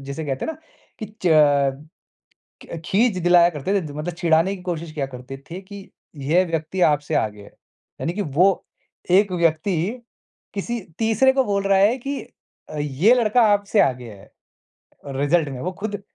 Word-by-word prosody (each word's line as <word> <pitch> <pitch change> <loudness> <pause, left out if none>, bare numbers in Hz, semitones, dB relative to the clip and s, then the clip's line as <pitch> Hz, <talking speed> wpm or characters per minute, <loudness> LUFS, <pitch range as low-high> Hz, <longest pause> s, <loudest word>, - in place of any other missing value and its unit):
जिसे 140 +3 -6
कहते 135 -2 -3
हैं - - -2
ना, 310 - -15 0.4
कि 215 - -5 0.2
च 180 - +2 1.4
क्य 165 - -7
खींज 215 +1 +2
दिलाया 175 0 +6
करते 155 +3 -3
रहते 190 -6 0
थे, - - -8
मतलब 155 +4 -4
चिढ़ाने 170 +2 +2
की 180 - -13
कोशिश 170 -2 -4
किया 140 -3 -3
करते 130 +1 -9
थे 180 +3 -6
कि, 195 0 -12 0.3
यह 155 +6 +2
व्यक्ति 165 +2 -3
आपसे 150 -2 +2
आगे 105 -5 -1
है। - - -15 0.5
यानी 170 - -2
कि 205 - -2
वो 180 +5 +2 0.5
एक 195 +1 +4
व्यक्ति 170 +1 +1 0.8
किसी 235 +4 -3 0.2
तीसरे 225 +4 +3
को 265 0 +2
बोल 200 -3 0
रहा 195 -1 +3
है 210 +5 +4
कि 275 +2 -4 0.5
अ, 155 - -7
ये 150 - +3
लड़का 240 0 +3
आपसे 205 +1 +2
आगे 125 -3 0
है, 100 -2 -15 0.8
रिज़ल्ट 145 +4 +1
में, 130 -2 -7
वो 180 - -3
खुद 205 -2 -4
175 Hz, 175 wpm, -22 LUFS, 150-200 Hz, 1.4 s, दिलाया